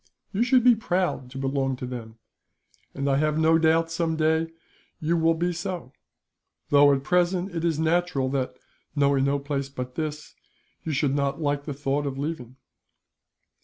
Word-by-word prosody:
You 200 - 0
should 250 0 +4
be 250 -1 +7
proud 180 - -1
to 135 - -9
belong 135 0 -1
to 125 - -6
them, 115 -3 -7 0.8
and 140 0 -2
I 135 -1 +3
have 155 +1 +1
no 160 +1 +4
doubt 165 +1 +3
some 165 -1 0
day 160 +1 +2 0.5
you 160 +2 0
will 165 0 +3
be 175 +2 0
so; 175 -5 -5 0.8
though 145 0 +6
at 135 -1 +1
present 180 +4 +1
it 165 - -2
is 165 -3 +1
natural 160 -3 +1
that, 130 -2 -2 0.4
knowing 140 -2 +3
no 140 +1 +2
place 140 -1 -3
but 125 -2 -6
this, 155 +1 -5 0.5
you 160 - -3
should 140 -1 +1
not 140 +1 0
like 145 -2 -1
the 145 - -4
thought 145 +1 -1
of 135 -1 -4
leaving." 135 -4 -4
150 Hz, 170 wpm, -25 LUFS, 135-165 Hz, 0.8 s, be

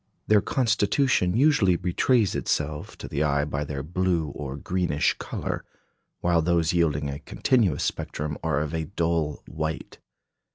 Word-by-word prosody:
Their 105 -1 +4
constitution 115 -4 +2
usually 135 - +4
betrays 95 +5 +2
itself 75 0 -2
to - - -7
the 70 - -2
eye 70 -1 +2
by 75 0 -2
their 70 -2 -4
blue 85 -1 0
or 70 -1 -6
greenish 90 -1 0
colour; - - -4 0.6
while 85 -1 +3
those 85 0 +2
yielding 75 -4 +1
a 70 0 -5
continuous 110 - +1
spectrum 75 0 -3
are 75 - +1
of 75 +1 -3
a 80 -1 -1
dull 80 -3 -1
white. 80 0 -5
80 Hz, 140 wpm, -26 LUFS, 75-95 Hz, 0.6 s, Their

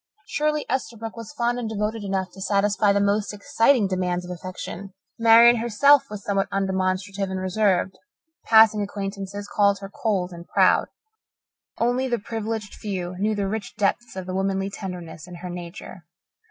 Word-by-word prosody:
Surely 300 -6 -1
Esterbrook 230 -4 -3
was 230 -2 -8
fond 245 -3 -1
and 230 -3 -3
devoted 215 0 -2
enough 190 -2 -2
to 195 - -12
satisfy 205 +1 +2
the 200 - +2
most 200 +1 +1
exacting 225 +2 +3
demands 180 -1 -1
of 180 - -7
affection. 185 +2 -7 0.3
Marian 230 +1 +7
herself 240 +5 +4
was 210 -1 -7
somewhat 195 -1 0
undemonstrative 190 0 -1
and 190 0 -3
reserved. 190 0 0 0.4
Passing 220 -1 +6
acquaintances 200 0 -5
called 200 -1 +2
her 195 0 -9
cold 195 -5 -1
and 170 0 -10
proud. - - +3 0.9
Only 245 +3 +1
the 240 -2 0
privileged 220 -1 -4
few 185 -4 -4
knew 215 +2 +1
the 200 -1 -1
rich 210 +1 -4
depths 225 +3 -1
of 190 -1 -5
womanly 195 +1 -1
tenderness 175 -5 -7
in 180 - -9
her 180 +1 -7
nature. 175 0 -9
200 Hz, 155 wpm, -24 LUFS, 190-220 Hz, 0.9 s, Marian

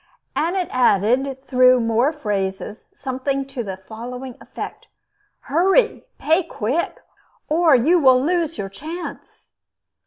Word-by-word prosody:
And 335 +4 0
it 365 -3 0
added, 255 +3 +2
though 255 0 +6
with 240 - 0
more 230 +5 +2
phrases, 205 -7 -4
something 270 +1 -3
to 270 -3 -5
the 190 -3 -5
following 240 +5 -8
effect: - - -8 0.5
Hurry! 385 - +2
Pay 320 +5 +2
quick! 270 +6 -2 0.5
Or 320 -1 +4
you 315 +9 +4
will 260 -4 +6
lose 330 +2 0
your 195 - -3
chance! 320 - -9
265 Hz, 125 wpm, -21 LUFS, 235-320 Hz, 0.5 s, though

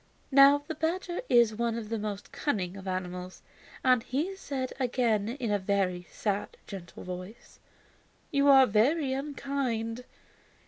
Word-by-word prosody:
Now, 280 +1 +7
the - - -3
badger 345 +3 -2
is 235 -2 +5
one 230 +1 -1
of 220 -2 -6
the 225 -1 -2
most 205 -1 -5
cunning 195 - -2
of 195 -1 -9
animals, 180 0 -5 0.4
and 255 -2 +4
he 305 +12 -2
said 270 -8 -4
again 235 -5 +1
in 235 -4 -1
a 205 - +2
very 185 -2 -1
sad, 205 -1 -3
gentle, 185 -4 -9
voice: 185 +5 -9 0.7
"You 280 0 +3
are 270 -1 +8
very 260 +6 +2
unkind. 265 -4 -3
235 Hz, 140 wpm, -29 LUFS, 200-275 Hz, 0.7 s, are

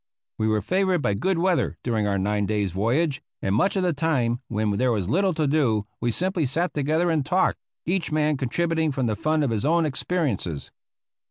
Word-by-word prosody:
We 110 - +1
were 110 -2 +1
favored 185 - +1
by 100 - +1
good 185 - 0
weather 180 0 +1
during 110 -4 0
our 100 -1 0
nine 105 +1 0
days' 105 -3 0
voyage, 130 - 0 0.2
and 95 - -1
much 135 - +2
of 190 - +1
the 175 -2 +1
time 135 -6 0
when 105 0 -1
there 125 +5 +1
was 100 -6 -1
little 185 - +1
to 155 - +1
do 130 -8 +1
we 120 - 0
simply 175 - 0
sat 170 +7 -1
together 155 +4 +1
and 155 -3 +1
talked, 180 +7 +1 0.3
each 180 -1 -1
man 150 0 +2
contributing 160 +4 0
from 130 -2 -1
the 110 -2 0
fund 155 +7 0
of 135 - 0
his 110 -1 -1
own 165 +3 +3
experiences. 130 - -2
140 Hz, 200 wpm, -24 LUFS, 110-170 Hz, 0.3 s, own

